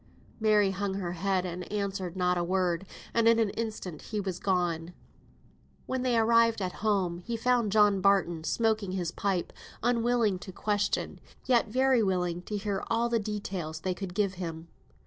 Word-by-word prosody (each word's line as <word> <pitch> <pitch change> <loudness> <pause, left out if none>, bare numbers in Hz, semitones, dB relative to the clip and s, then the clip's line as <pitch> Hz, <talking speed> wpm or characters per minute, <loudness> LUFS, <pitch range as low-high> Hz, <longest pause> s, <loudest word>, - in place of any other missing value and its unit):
Mary 210 -3 +4
hung 195 0 -2
her 180 -3 -3
head 185 +1 0
and 180 +1 -6
answered 195 -3 -3
not 180 -1 +2
a 175 - 0
word, 185 0 0 0.3
and 230 -1 +3
in 230 0 +6
an 220 -3 +2
instant 215 -8 -5
he 215 - -4
was 190 -3 -3
gone. 175 -3 0 0.9
When 260 -1 -2
they 250 -2 +2
arrived 230 0 +4
at 185 -2 -2
home, 185 -5 0
they 235 - -1
found 240 -3 +2
John 205 -2 +4
Barton 185 -4 +2
smoking 220 0 0
his 175 -3 -2
pipe, 190 -3 -1 0.3
unwilling 235 -4 +2
to 190 - -8
question, 205 +2 -1 0.3
yet 240 -3 +3
very 260 +2 +3
willing 180 -3 0
to 210 - -1
hear 200 -1 -2
all 235 +1 +1
the 235 -1 +2
details 195 -7 -4
they 185 +1 -1
could 185 -1 -6
give 200 -2 +1
him. 165 -1 -6
200 Hz, 170 wpm, -29 LUFS, 180-220 Hz, 0.9 s, in